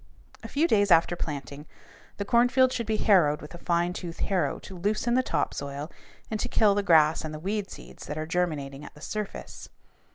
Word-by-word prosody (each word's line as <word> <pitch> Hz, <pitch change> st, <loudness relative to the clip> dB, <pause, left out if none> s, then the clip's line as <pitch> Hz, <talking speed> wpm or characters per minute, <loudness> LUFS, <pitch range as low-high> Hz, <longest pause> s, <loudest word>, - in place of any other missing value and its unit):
A -, -, -7 dB
few 310 Hz, +4 st, +1 dB
days 205 Hz, -7 st, +3 dB
after 170 Hz, 0 st, +5 dB
planting, 145 Hz, -2 st, -6 dB, 0.5 s
the 200 Hz, -, -3 dB
cornfield 250 Hz, +3 st, +4 dB
should 235 Hz, -3 st, -3 dB
be 220 Hz, -1 st, 0 dB
harrowed 165 Hz, -10 st, +4 dB
with 150 Hz, -, -11 dB
a 175 Hz, -, -9 dB
fine 175 Hz, 0 st, 0 dB
tooth 170 Hz, -2 st, -6 dB
harrow 190 Hz, -3 st, 0 dB
to 190 Hz, -, -11 dB
loosen 210 Hz, +6 st, 0 dB
the 255 Hz, -, +4 dB
top -, -, -1 dB
soil 140 Hz, +2 st, -5 dB, 0.4 s
and 215 Hz, -, -2 dB
to -, -, -2 dB
kill 210 Hz, -2 st, +4 dB
the 205 Hz, -, +1 dB
grass 160 Hz, -5 st, +4 dB
and 155 Hz, -, -5 dB
the -, -, -7 dB
weed 200 Hz, +3 st, -3 dB
seeds -, -, -11 dB
that 150 Hz, -, -5 dB
are 155 Hz, -, -3 dB
germinating 150 Hz, -5 st, -2 dB
at -, -, -11 dB
the -, -, -14 dB
surface. 210 Hz, +3 st, -6 dB
175 Hz, 205 wpm, -27 LUFS, 155-210 Hz, 0.5 s, after